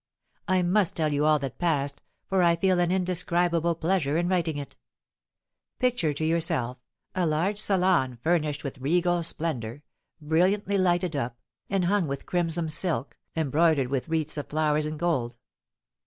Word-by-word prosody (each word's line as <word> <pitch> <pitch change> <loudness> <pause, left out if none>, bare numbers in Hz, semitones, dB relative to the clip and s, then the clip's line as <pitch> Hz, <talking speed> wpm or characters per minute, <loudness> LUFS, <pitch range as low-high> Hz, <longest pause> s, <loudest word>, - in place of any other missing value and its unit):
I 185 -1 +2
must 185 +1 +2
tell 155 -2 +1
you 145 +1 +1
all 155 0 +5
that 135 -3 -6
passed, 145 -5 0 0.3
for 190 -1 +2
I 170 -1 +4
feel 185 +1 +2
an 175 0 +2
indescribable 175 -2 +1
pleasure 160 -3 0
in 175 +1 +1
writing 170 -4 0
it. 140 -2 -7 1.0
Picture 245 -11 +1
to 150 +2 -3
yourself 160 -7 0 0.3
a 180 -2 +1
large 175 +7 0
salon 180 - +2
furnished 155 -3 0
with 140 -1 -6
regal 175 +5 +1
splendour, 145 -6 -3 0.4
brilliantly 185 +6 +1
lighted 175 -2 +1
up, 120 -4 -3 0.3
and 195 -2 +1
hung 195 -2 +2
with 140 0 -5
crimson 170 -2 0
silk, 155 -2 -2 0.2
embroidered 155 -3 +2
with 135 +3 -2
wreaths 160 -2 -1
of 145 - -4
flowers 150 0 +1
in 155 0 -5
gold. 130 -8 -1
165 Hz, 155 wpm, -27 LUFS, 150-180 Hz, 1.0 s, all